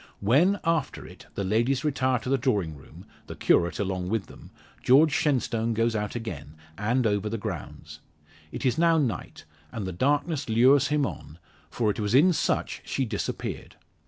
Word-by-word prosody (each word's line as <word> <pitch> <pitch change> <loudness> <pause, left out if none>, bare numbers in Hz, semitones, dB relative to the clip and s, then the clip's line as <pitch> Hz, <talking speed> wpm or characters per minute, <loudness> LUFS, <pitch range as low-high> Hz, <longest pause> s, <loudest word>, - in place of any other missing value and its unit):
When, 155 - +3
after 165 -4 -1
it, - - -14
the 100 - -2
ladies 120 +8 +1
retire 130 -3 +1
to 120 +2 -6
the 135 0 +2
drawing 105 - 0
room 70 - -14 0.2
the - - -7
curate 85 0 +2
along 95 -2 -2
with 110 -2 -1
them - - -14 0.3
George 145 +5 +5
Shenstone 120 -7 0
goes 115 +1 +1
out 105 0 -3
again, 90 -10 -6 0.2
and 120 +6 0
over 105 -1 0
the 115 - -3
grounds. 100 - -7 0.5
It - - -5
is 130 +4 +1
now 165 -1 +4
night, 125 - -3 0.3
and 105 -4 -5
the 95 - -4
darkness 145 - 0
lures 125 +5 +5
him 150 -1 +1
on; 80 - -8 0.3
for 110 -3 0
it - - -7
was 105 +2 0
in 175 +7 +6
such - - -1
she 135 - -2
disappeared. 105 -3 -5
115 Hz, 175 wpm, -26 LUFS, 105-140 Hz, 0.5 s, in